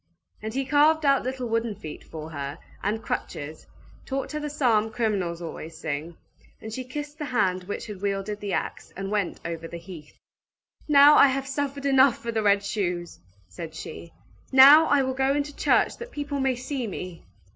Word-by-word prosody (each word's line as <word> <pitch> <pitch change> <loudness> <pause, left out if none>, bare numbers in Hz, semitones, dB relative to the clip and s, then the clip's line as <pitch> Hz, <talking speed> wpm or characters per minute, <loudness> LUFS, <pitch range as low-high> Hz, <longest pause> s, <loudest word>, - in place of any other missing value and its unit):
And 220 +1 -4
he 270 0 0
carved 300 +3 +4
out 275 -1 +4
little 255 0 -4
wooden 230 -1 -1
feet 155 -5 -9
for 160 0 -8
her, 140 -1 -5 0.2
and 215 +3 -2
crutches, 155 +2 -5 0.4
taught 270 0 -4
her 300 - -3
the 295 0 -4
psalm 230 -7 +2
criminals 195 -7 -1
always 165 0 -7
sing; 155 +2 -5 0.4
and 220 0 -8
she 255 - -4
kissed 295 +4 -7
the 300 - -3
hand 190 -8 0
which 205 - -5
had 205 -4 -8
wielded 200 +1 -2
the 205 -1 -4
axe, - - -3
and 195 +1 -4
went 205 -4 -1
over 165 -1 -4
the 170 - -7
heath. 165 -3 -12 0.7
"Now 290 0 +8
I - - +8
have 270 0 -1
suffered 280 0 -3
enough 270 -2 +5
for 235 - -5
the 220 -1 0
red 200 -1 +3
shoes!" 180 -4 -3 0.3
said 95 - -8
she. 85 0 -8 0.4
"Now 280 +4 +9
I 285 -1 +4
will 260 0 -1
go 265 +1 +1
into 290 0 -1
the - - -19
church - - +3
that 475 +1 -7
people 290 - -4
may 265 -1 +1
see 255 0 -4
me!" 180 -3 -7
225 Hz, 190 wpm, -26 LUFS, 180-275 Hz, 0.7 s, Now